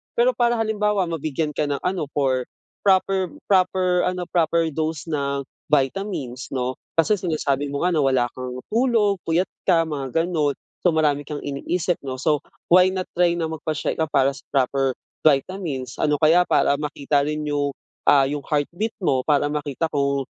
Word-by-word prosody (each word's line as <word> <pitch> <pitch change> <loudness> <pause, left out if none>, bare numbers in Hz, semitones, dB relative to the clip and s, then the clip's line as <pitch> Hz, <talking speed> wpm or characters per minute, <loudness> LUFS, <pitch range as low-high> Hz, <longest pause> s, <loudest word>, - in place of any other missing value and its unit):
pero 485 +1 +4
para 240 - +2
halimbawa 210 -3 +1
mabigyan 155 -1 -2
ka 150 0 -1
ng 140 -1 -3
ano 180 -4 -1
for 130 -3 +1 0.4
proper 190 -1 +3 0.2
proper 185 -2 +2
ano 180 0 -2
proper 165 -1 +2
dose 155 0 -2
ng 140 -2 -1 0.2
vitamins 140 -3 -1
'no. 130 0 -2 0.2
Kasi 205 +6 +3
sinasabi 145 -5 -1
mo 140 +2 -3
nga 180 - +2
na 165 - +1
wala 130 -2 +3
kang 125 0 -6
tulog, 225 -4 +2
puyat 170 +3 +1 0.2
ka, 170 -3 +5
mga 140 -5 -5
gano'n. 155 -5 0 0.3
So 175 - +5
marami 145 -2 +1
kang 150 -1 -5
iniisip 165 +5 -1
'no. 130 -1 -3
So 150 -1 +2 0.3
why 180 +1 +7
not 185 -1 -3
try 175 -1 +4
na 165 -2 -2
magpa-check 155 -1 -3
ka 160 - +3
para 135 -2 +3
sa 135 - -13
proper 135 0 +1 0.3
vitamins 140 -4 0
ano, 150 -1 +2
kaya 165 +3 +6
para 140 - +3
makita 145 -1 0
rin 150 0 -2
'yung, 145 -1 0 0.3
ah, 140 -1 +6
'yung 145 0 -3
heartbeat 170 +9 -1
mo. 130 -6 +2
Para 145 -1 +3
makita 150 +1 -2
kung, 140 -1 0
155 Hz, 170 wpm, -23 LUFS, 140-180 Hz, 0.4 s, why